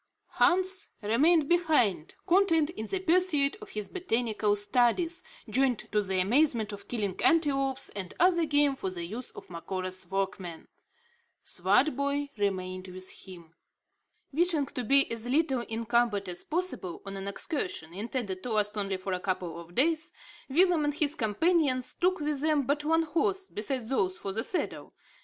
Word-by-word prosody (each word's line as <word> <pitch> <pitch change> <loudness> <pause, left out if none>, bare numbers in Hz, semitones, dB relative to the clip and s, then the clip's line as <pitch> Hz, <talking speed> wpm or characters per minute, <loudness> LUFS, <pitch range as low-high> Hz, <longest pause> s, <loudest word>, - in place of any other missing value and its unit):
Hans 375 +1 +3
remained 290 +9 +3
behind, 300 - +2
content 340 -4 +3
in 220 -8 -6
the 385 - -1
pursuit 350 -5 +2
of 425 - -10
his 210 -1 -4
botanical 225 - 0
studies, 250 - +1 0.2
joined 250 +2 +2
to 210 - +2
the 190 -2 -1
amusement 225 +1 +2
of 200 0 -10
killing 205 -6 -3
antelopes, 275 -5 +2
and 190 -3 -6
other 345 -1 +4
game 290 -2 +3
for 190 - -3
the 175 -2 -5
use 225 +8 -5
of - - -12
Macora's 185 +1 -4
workmen. 190 -3 -3 0.8
Swartboy 280 - +1
remained 185 -2 -2
with 185 0 -5
him. 170 -3 -12 0.8
Wishing 325 -2 +2
to 250 - -5
be 275 +4 +6
as 230 +1 -2
little 270 -2 +2
encumbered 225 -3 +1
as 175 0 -5
possible 330 - -4
on 195 0 -6
an 195 0 -5
excursion, 195 - -3
intended 205 -2 -4
to 240 +1 -3
last 210 0 0
only 195 -2 -1
for 185 0 -4
a 180 - -1
couple 180 -3 -3
of 170 +1 -13
days, 320 +4 +1 0.4
Willem 340 +2 +4
and 295 0 0
his 300 -1 +1
companions 265 - +1
took 370 +1 +1
with 295 -2 -1
them 305 -2 +2
but 285 +3 0
one 325 +2 +2
horse, 380 +4 -1
besides 225 +2 -3
those 185 -8 +1
for 195 - -4
the 225 +2 +1
saddle. 360 - -3
245 Hz, 155 wpm, -29 LUFS, 195-315 Hz, 0.8 s, be